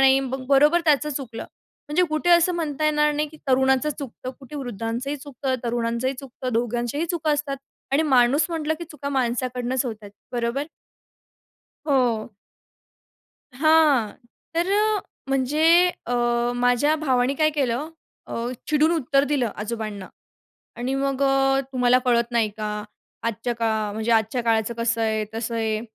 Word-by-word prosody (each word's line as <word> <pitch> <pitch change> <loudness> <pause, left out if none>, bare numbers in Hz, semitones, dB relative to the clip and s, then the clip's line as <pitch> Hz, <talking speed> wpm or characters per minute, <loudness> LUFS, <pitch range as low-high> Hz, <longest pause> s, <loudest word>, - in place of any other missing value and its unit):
नाही 270 0 +6
मग 265 0 -4
बरोबर 295 +5 +5
त्याचं 300 -1 +3
चुकलं. 260 -5 -5 0.5
म्हणजे 300 +5 +2
कुठे 310 +3 0
असं 345 +1 +5
म्हणता 310 -3 -2
येणार 300 0 +3
नाही, 300 +1 -1
की 310 - -14
तरुणाचं 265 +2 +3
चुकतं, 255 -2 -6
कुठे 275 +2 -9
वृद्धांचंही 245 +2 -3
चुकतं, 270 -2 -4
तरुणांचंही 235 +2 -1
चुकतं 255 -1 -6
दोघांच्याही 240 +6 -1
चुका 320 -3 -1
असतात 290 -2 -2 0.4
आणि 290 - +4
माणूस 275 +1 +4
म्हटलं, 315 -2 -1
की 340 - -6
चुका 300 -3 -7
माणसाकडूनच 250 -1 -1
होतात. 215 -3 -7 0.2
बरोबर? 240 +3 -1 1.2
हो. 240 -5 +1 1.3
हां. 305 -8 +4 0.4
तर 340 +2 +1 0.6
म्हणजे 270 +3 0 0.4
अ, 245 - -1 0.4
माझ्या 245 +5 +3
भावाने 265 -4 +1
काय 310 +1 +3
केलं 280 0 -1 0.4
अ, - - -7 0.3
चिडून 305 +2 +3
उत्तर 280 -4 +2
दिलं 280 -5 0
आजोबांना 210 -2 -5 0.7
आणि 250 +3 -2
मग 275 0 -1
अ, 270 0 +3
"तुम्हाला 250 -1 +4
कळत 235 -1 +2
नाही 230 -2 +2
का? 210 -1 -4 0.4
आजच्या 230 +1 -2
का 230 -1 0 0.2
म्हणजे 220 +2 -2
आजच्या 225 +2 +1
काळाचं 225 0 +1
कसं 230 -1 0
आहे, 220 -1 0
तसं 225 +1 -3
आहे," 220 -1 -1
260 Hz, 140 wpm, -23 LUFS, 235-295 Hz, 1.3 s, नाही